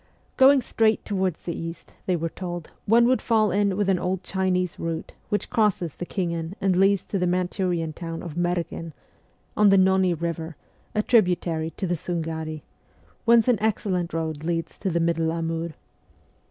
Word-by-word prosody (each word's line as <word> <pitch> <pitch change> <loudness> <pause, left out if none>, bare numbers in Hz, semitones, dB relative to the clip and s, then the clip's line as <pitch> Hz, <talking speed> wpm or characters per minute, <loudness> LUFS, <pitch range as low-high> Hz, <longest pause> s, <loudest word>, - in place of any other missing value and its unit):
Going 270 0 +6
straight 220 -1 +1
towards 190 -4 -1
the 170 - -3
east, 165 +1 -7
they 185 - +2
were 165 0 -1
told, 175 -2 -6 0.2
one 235 +3 +6
would 255 +1 +3
fall 215 -2 +2
in 200 -1 +1
with 205 -2 +1
an 190 -2 +2
old 185 +1 -2
Chinese 185 -2 -1
route 165 -1 -4 0.2
which 205 - -2
crosses 205 - +1
the 175 - -6
Khingan 170 -2 -3
and 195 -2 +2
leads 195 0 +3
to 195 - -2
the 180 - +1
Manchurian 180 -2 -1
town 165 0 -6
of 170 -4 -6
Merghen 175 -2 -2 0.6
(on 210 -1 +5
the 195 - +6
Nonni 190 -1 +4
river, 165 0 -4 0.4
a 210 - +2
tributary 175 -8 +2
to - - -2
the 175 - 0
Sungari), 160 -2 -4 0.6
whence 235 -1 +5
an 240 -4 +3
excellent 190 -5 0
road 160 -2 -3
leads 165 0 -2
to 195 - -1
the 170 -1 0
middle 165 -1 +1
Amur. 165 0 -3
180 Hz, 170 wpm, -25 LUFS, 165-195 Hz, 0.6 s, Going